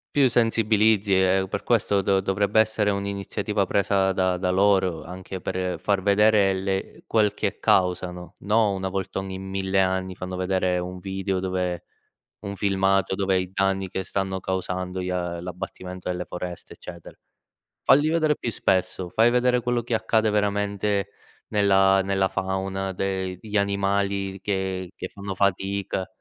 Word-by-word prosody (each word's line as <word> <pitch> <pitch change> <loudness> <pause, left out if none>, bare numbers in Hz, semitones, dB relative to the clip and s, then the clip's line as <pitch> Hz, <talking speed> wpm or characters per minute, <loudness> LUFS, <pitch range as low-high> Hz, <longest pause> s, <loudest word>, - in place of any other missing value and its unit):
Più 135 -3 +5
sensibilizzi 110 -3 +3
e 95 0 +3
per 100 - -3
questo 105 -4 +2
do 95 0 +2
dovrebbe 100 +2 +1
essere 110 -1 +2
un'iniziativa 100 +1 -2
presa 95 0 +2
da 95 -1 +1
da 90 +1 -1
loro 95 -4 +2
anche 95 +1 -7
per 90 -1 -3
far 95 +2 0
vedere 100 0 +4
le 95 0 -3
quel 105 -2 +2
che - - -3
causano. 90 -1 0
No, 105 0 +2
una 95 0 -3
volta 95 0 -3
ogni 95 -1 -5
1000 95 0 -1
anni 95 0 0
fanno 90 0 -6
vedere 90 -1 0
un 90 +1 -5
video 95 0 -2
dove 90 -2 -2 0.5
un 100 0 -6
filmato 95 -1 +1
dove 95 -1 +1
i 90 -1 -3
danni 95 -1 0
che 95 - -3
stanno 95 0 -2
causando 95 0 -3
gli 90 - -3
a 90 -1 -3
l'abbattimento 90 0 -7
delle 90 0 -2
foreste, 90 -1 -7
eccetera. 85 -2 -11 0.7
Falli 145 +3 +5
vedere 155 -2 +2
più 120 - -2
spesso, 95 -1 0
fai 115 +6 +4
vedere 125 0 +2
quello 120 0 0
che 120 0 -2
accade 110 0 +2
veramente 100 -1 0 0.4
nella 95 -2 +4
nella 95 0 +1
fauna, 95 0 -2
de 95 -1 -3
gli 105 -1 -5
animali 100 -1 0
che 95 -2 -2
che - - -6
fanno 100 -1 -6
fatica, 100 0 -1
95 Hz, 150 wpm, -24 LUFS, 95-100 Hz, 0.7 s, Più